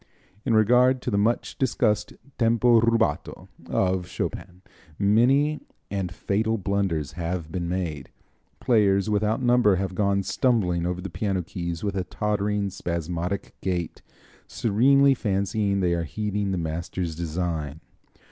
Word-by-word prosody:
In 115 - +2
regard 125 +4 +4
to - - -2
the 100 - +1
much 115 +4 0
discussed 105 -5 +1 0.3
tempo 115 0 +4
rubato 115 -8 0 0.2
of 95 -1 0
Chopin 90 +1 -5 0.3
many 130 +9 +3 0.3
and 95 -3 -2
fatal 110 +5 -1
blunders 95 -7 -1
have 85 -1 -4
been 85 -1 -3
made. 85 -6 -3 0.5
Players 105 -4 +2
without 105 +4 0
number 120 -5 +4
have 95 0 -2
gone 100 0 +1
stumbling 90 -9 +1
over 90 0 -3
the 95 -1 -6
piano 95 -1 -1
keys 85 -1 -5
with 100 -1 -2
a 95 - 0
tottering, 105 0 -1
spasmodic 85 +1 -3
gait, 90 -3 -3 0.5
serenely 135 +6 +4
fancying 100 -3 0
they 90 -2 +2
are 85 -1 -1
heeding 105 +3 -2
the 95 - -1
master's 85 +1 -3
design. 80 -3 -3
100 Hz, 130 wpm, -25 LUFS, 90-110 Hz, 0.5 s, regard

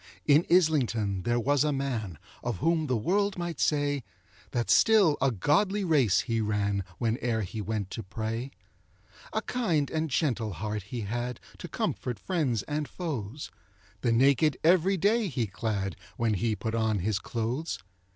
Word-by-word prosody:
In 150 +3 +5
Islington 120 - +2
there 120 +5 +1
was 140 +3 +2
a 150 - +1
man, 120 - -2 0.3
Of 120 -5 -2
whom 160 - +1
the 125 -3 +1
world 200 - +1
might 175 -4 -4
say, 145 -2 +1 0.5
That 120 -1 -1
still 205 -9 +5
a 135 - +4
godly 190 - +1
race 135 - +3
he 115 -2 -1
ran, 100 -2 0 0.2
Whene'er 115 -1 0
he 105 +3 -5
went 100 -1 -3
to 115 - -4
pray. 110 +5 -4 0.8
A - - -1
kind 170 - 0
and 160 0 -1
gentle 120 -7 0
heart 105 +4 -3
he 120 - -4
had, 120 +3 -3 0.2
To - - -6
comfort 120 -3 -2
friends 135 - -1
and 150 0 -3
foes; 140 - -5 0.5
The 120 - +2
naked 140 +4 +4
every 185 +3 +4
day 210 +4 +2
he 130 -8 -1
clad, 100 -1 -3 0.2
When 115 -2 +1
he 110 +3 0
put 110 +1 -4
on 110 -2 +1
his 100 +1 0
clothes. 120 - -3
125 Hz, 160 wpm, -28 LUFS, 110-155 Hz, 0.8 s, In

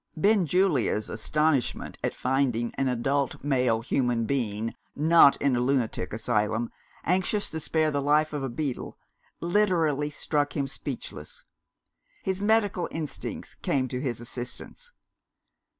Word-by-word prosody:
Benjulia's 180 - +2
astonishment 145 +4 0
at - - -1
finding 125 -3 0
an 135 - 0
adult 135 +3 0
male 125 -5 +2
human 120 -1 0
being 115 -4 -1 0.2
(not 155 -1 +6
in 140 -3 +2
a - - +1
lunatic 125 -7 0
asylum) 110 +1 0 0.3
anxious 190 +4 0
to 160 - -3
spare 155 0 +1
the 145 -1 0
life 150 +2 +2
of 145 - -2
a 135 - -2
beetle, 130 +1 -4 0.4
literally 170 -6 +2
struck 145 0 -1
him 140 - +1
speechless. - - -6 0.8
His 190 0 -1
medical 205 -4 +2
instincts 155 -3 -5
came 130 -2 -1
to 125 0 -3
his 125 -5 -2
assistance. 125 - -6
140 Hz, 125 wpm, -27 LUFS, 120-160 Hz, 0.8 s, not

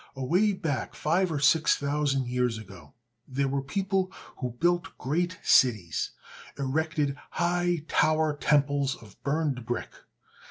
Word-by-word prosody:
Away 175 +11 +2
back 155 -8 -3
five 175 +3 +1
or 150 - -1
six 150 +3 +4
thousand 140 -2 0
years 125 -2 0
ago 95 -9 -12 0.3
there 135 +1 0
were 135 +1 -1
people 190 +6 -1 0.3
who 125 -3 -4
built 175 0 +1
great 175 +6 -1
cities, 105 -10 +3 0.5
erected 145 +1 0
high 175 -2 0
tower 155 -1 +2
temples 145 -2 +2
of 105 -4 -17
burned 140 -3 -1
brick. 120 +1 -3
145 Hz, 125 wpm, -28 LUFS, 130-165 Hz, 0.5 s, six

